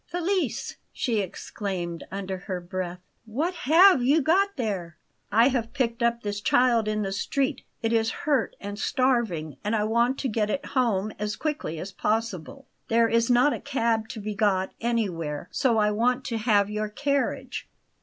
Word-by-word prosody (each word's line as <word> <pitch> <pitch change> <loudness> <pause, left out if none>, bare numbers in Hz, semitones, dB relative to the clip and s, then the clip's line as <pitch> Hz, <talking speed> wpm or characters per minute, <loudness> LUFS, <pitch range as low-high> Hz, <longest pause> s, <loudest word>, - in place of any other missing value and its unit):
"Felice!" 360 +2 -1
she 230 -4 -1
exclaimed 185 -2 -4
under 190 -1 -4
her 185 -1 -4
breath, 180 0 -5 0.2
"what 290 +12 -1
HAVE 340 0 +6
you 280 +6 +4
got 365 +7 +3
there?" 195 - -3 0.3
"I 230 +5 +5
have 235 -3 -2
picked 235 -2 -1
up 235 0 +1
this 205 -1 -3
child 240 -1 +3
in 215 0 0
the 195 - -2
street. 265 +7 -1 0.2
It 225 0 +1
is 225 0 +2 0.2
hurt 280 -7 +1
and 205 +1 -6
starving; 230 - 0
and 210 +2 0
I 210 - +1
want 235 +4 +2
to 270 - 0
get 215 -2 0
it 280 - -2
home 215 -6 0
as 210 0 -2
quickly 295 - -3
as 185 +5 -6
possible. 220 - -2 0.2
There 230 0 +4
is 230 +1 +2
not 250 +4 +4
a - - -4
cab 230 -5 0
to - - -6
be 210 0 -4
got 195 -3 +1
anywhere, 180 -11 -2
so 255 -5 +2
I 210 -1 +3
want 245 +4 +1
to 230 -3 -2
have 210 -3 +3
your 210 0 -3
carriage." 280 +5 -2
225 Hz, 175 wpm, -26 LUFS, 200-255 Hz, 0.3 s, HAVE